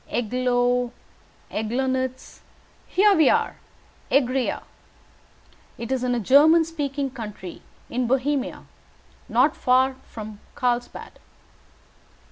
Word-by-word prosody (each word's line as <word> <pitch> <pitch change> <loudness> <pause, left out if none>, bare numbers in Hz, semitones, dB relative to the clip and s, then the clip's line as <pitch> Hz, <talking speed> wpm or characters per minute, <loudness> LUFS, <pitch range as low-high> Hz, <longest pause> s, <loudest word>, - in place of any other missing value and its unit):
"Eglow, 245 +1 +1 0.6
Eglonitz 260 +3 -2 0.5
here 410 +2 +4
we 315 -5 +5
are, - - +1 0.5
Egria. 265 -2 +1 1.1
It 235 +2 -6
is 260 -1 0
in 250 -1 +1
a - - 0
German 305 - +6
speaking 285 -4 -3
country 210 -7 -8 0.3
in 245 0 -1
Bohemia, 270 +2 -1 0.7
not 255 +7 +3
far 260 +1 +3
from 215 -2 -9 0.2
Carlsbad. 245 -1 -2
255 Hz, 95 wpm, -24 LUFS, 245-275 Hz, 1.1 s, German